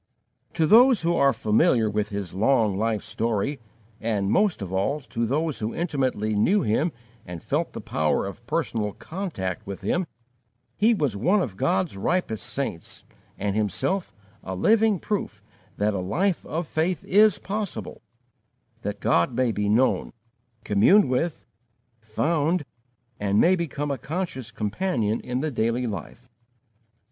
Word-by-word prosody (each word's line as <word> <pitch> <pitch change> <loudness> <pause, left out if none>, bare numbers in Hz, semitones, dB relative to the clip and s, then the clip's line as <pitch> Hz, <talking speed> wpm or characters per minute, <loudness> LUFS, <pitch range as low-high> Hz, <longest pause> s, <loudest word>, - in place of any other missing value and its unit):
To 160 - +3
those 230 +3 +6
who 170 +1 +2
are 140 0 +4
familiar 115 +1 +2
with 105 0 -1
his 100 -5 -5
long 110 0 +2
life 110 0 -1
story, 115 +5 -2 0.4
and, 105 -3 -1
most 195 - +2
of 95 -1 -6
all, 135 +11 0
to 115 -3 -3
those 150 +4 -1
who 110 +1 -3
intimately 130 - -1
knew 180 - +3
him 145 +11 +1 0.3
and 85 -3 -8
felt - - -1
the - - -6
power 75 -1 0
of - - -8
personal 105 -3 -1
contact 155 - -5
with 100 0 -6
him, 175 - 0 0.7
he 225 +2 +4
was 145 - 0
one 180 - +2
of 120 - -2
God's 95 0 0
ripest 110 - -1
saints 130 - -5 0.3
and 100 0 -2
himself 110 - -1 0.3
a 95 - -5
living 220 - +3
proof 205 +4 -4 0.3
that 105 +1 +1
a 95 - -2
life 170 - 0
of 165 +1 -3
faith 160 +2 -1
is 210 +1 +5
possible; 195 - -5 0.8
that - - -4
God 85 +8 +2
may 125 -1 +2
be 105 -1 -1
known, 120 +5 +2 0.5
communed 125 - +4
with, 155 +6 -1 0.5
found, 150 +9 0 0.5
and 100 0 +1
may 180 +3 +5
become 145 -4 -3
a 135 - -3
conscious 150 -4 -4
companion 110 - -1
in 125 +1 -3
the 155 0 -1
daily 115 +1 0
life. 120 +2 -6
125 Hz, 145 wpm, -25 LUFS, 105-170 Hz, 0.8 s, those